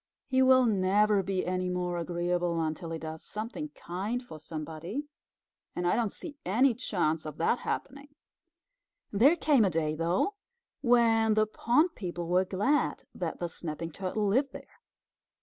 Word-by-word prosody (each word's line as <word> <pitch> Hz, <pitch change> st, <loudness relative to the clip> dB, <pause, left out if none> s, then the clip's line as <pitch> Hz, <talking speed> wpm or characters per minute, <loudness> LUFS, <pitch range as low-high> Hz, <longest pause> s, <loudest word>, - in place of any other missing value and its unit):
He 260 Hz, -1 st, +2 dB
will 260 Hz, -1 st, +6 dB
never 205 Hz, 0 st, +3 dB
be 190 Hz, 0 st, -2 dB
any 185 Hz, 0 st, -1 dB
more 180 Hz, -1 st, -2 dB
agreeable 175 Hz, 0 st, -1 dB
until 160 Hz, +1 st, -2 dB
he 165 Hz, -, -3 dB
does 160 Hz, 0 st, -7 dB
something 230 Hz, +8 st, -5 dB
kind 205 Hz, +8 st, -3 dB
for 160 Hz, -10 st, -10 dB
somebody, 160 Hz, -, -5 dB, 0.7 s
and 175 Hz, -, -2 dB
I 175 Hz, -, +3 dB
don't 225 Hz, -3 st, 0 dB
see 295 Hz, -3 st, -8 dB
any 240 Hz, +8 st, +3 dB
chance 175 Hz, -10 st, -1 dB
of 155 Hz, -1 st, -7 dB
that 200 Hz, +8 st, +1 dB
happening." 280 Hz, +2 st, -5 dB, 1.0 s
There 255 Hz, +11 st, +5 dB
came 295 Hz, -7 st, +3 dB
a 195 Hz, -, +3 dB
day, 155 Hz, -2 st, 0 dB
though, 170 Hz, -, 0 dB, 0.5 s
when 230 Hz, -3 st, +4 dB
the 215 Hz, 0 st, +4 dB
pond 250 Hz, -, +2 dB
people 175 Hz, -, -5 dB
were 180 Hz, +2 st, +3 dB
glad 205 Hz, +11 st, 0 dB
that -, -, -4 dB
the 175 Hz, -, -1 dB
Snapping 165 Hz, 0 st, -5 dB
Turtle 195 Hz, +5 st, -2 dB
lived 260 Hz, +8 st, +1 dB
there. -, -, -12 dB
190 Hz, 155 wpm, -29 LUFS, 170-240 Hz, 1.0 s, will